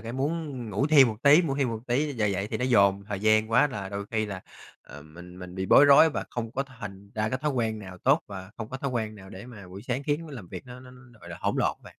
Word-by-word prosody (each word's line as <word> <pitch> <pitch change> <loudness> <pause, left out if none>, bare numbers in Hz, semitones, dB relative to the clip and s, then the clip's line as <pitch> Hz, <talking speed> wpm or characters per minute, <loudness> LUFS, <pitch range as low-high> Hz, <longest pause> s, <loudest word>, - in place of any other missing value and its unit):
cái 115 +1 -7
muốn 145 0 -3
ngủ 120 +9 0
thêm 140 -5 +6
một 110 - -4
tí, 150 +5 +7
ngủ 140 -4 -2
thêm 135 -3 +1
một 115 -1 -3
tí. 140 +5 0
Giờ 110 -4 0
dậy 100 0 -1
thì - - -1
nó 125 - -2
dồn 100 -5 +3
thời 100 -2 -4
gian 110 +1 +3
quá 125 +6 +5
là 100 -8 -6
đôi 100 0 -5
khi 110 -2 -1
là, 100 -2 -6 0.4
ờ, 70 +2 -12
mình 90 +4 -13
mình 90 0 -9
bị 95 0 -3
bối 145 - +7
rối 145 +3 +7
và - - -4
không 115 -2 -4
có 135 - -1
thành 105 -7 -11
ra 110 0 -1
cái 130 +3 -2
thói 150 +2 -1
quen 115 -5 -1
nào 95 -3 -10
tốt 140 +5 +3
và 95 -1 -9
không 110 -1 -6
có 130 - -5
thói 135 0 -3
quen 110 -3 -3
nào 95 -2 -13
để 100 +6 -10
mà 100 -7 -12
buổi 95 +3 -10
sáng 125 +3 -3
khiến 145 +2 -1
nó - - -11
làm 100 -10 -9
việc 90 +5 -9
nó 125 0 -10
nó, 130 0 -14 0.3
gọi 85 - -12
là, 85 - -7
hỗn - - -1
lộn - - +1
á - - -40
bạn. - - -13
110 Hz, 300 wpm, -27 LUFS, 100-135 Hz, 0.4 s, tí